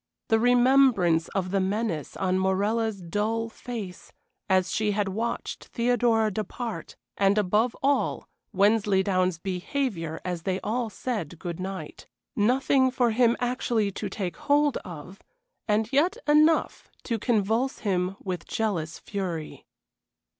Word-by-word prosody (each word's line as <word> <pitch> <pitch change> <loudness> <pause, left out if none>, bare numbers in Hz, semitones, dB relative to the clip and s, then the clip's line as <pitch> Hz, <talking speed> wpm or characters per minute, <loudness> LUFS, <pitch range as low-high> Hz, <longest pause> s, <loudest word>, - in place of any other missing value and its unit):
The 225 -1 +4
remembrance 245 -9 +4
of 185 -2 -1
the 195 - +2
menace 190 -5 -2
on 185 -1 +1
Morella's 200 +2 0
dull 220 +6 -1
face 220 -6 -8 0.4
as 185 -1 +2
she 210 -1 +1
had 205 -1 0
watched 230 +5 -3
Theodora 235 -2 +2
depart, 220 +3 -5 0.2
and, 200 +1 +3
above 210 +4 +2
all, 280 +1 +1 0.2
Wensleydown's 190 -3 +2
behavior 180 - -3
as 180 -2 -3
they 185 +1 -1
all 230 +3 -1
said 200 - -4
good 170 0 -6
night: 185 -4 -6 0.3
nothing 260 +4 +3
for 250 -2 +1
him 235 +1 +3
actually 240 -4 0
to 200 +1 -5
take 185 -2 -4
hold 290 -1 +2
of, 175 +3 -9 0.5
and 215 +3 +1
yet 345 - +3
enough 305 +2 +3
to 230 -3 -2
convulse 225 +3 0
him 185 -1 0
with 185 -3 -5
jealous 170 -7 -2
fury. 180 -6 -5
210 Hz, 125 wpm, -26 LUFS, 185-240 Hz, 0.5 s, The